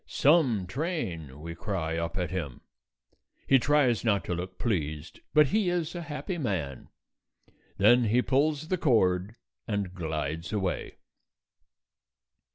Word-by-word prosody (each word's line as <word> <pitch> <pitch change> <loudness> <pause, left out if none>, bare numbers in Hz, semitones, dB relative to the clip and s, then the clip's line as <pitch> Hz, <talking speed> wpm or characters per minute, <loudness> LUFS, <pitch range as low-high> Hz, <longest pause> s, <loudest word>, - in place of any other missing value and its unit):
"Some 135 - +3
train," 90 - -4
we 85 +1 -6
cry 85 -3 -3
up 85 +3 -3
at 90 -1 -2
him; 80 -9 -4 0.8
he 135 - +5
tries 135 -4 +2
not 100 -4 +1
to - - -2
look 90 +2 -5
pleased, 80 -8 -2
but 150 -3 +5
he 210 -3 +2
is 175 -2 -1
a 175 - -5
happy 165 +3 -5
man. 85 - -3 0.9
Then 120 +5 +5
he 120 +3 +3
pulls 150 +3 +1
the 185 - 0
cord 100 - +2 0.3
and 100 -4 -2
glides 80 0 -3
away. 95 -4 -2
100 Hz, 130 wpm, -28 LUFS, -, 0.9 s, he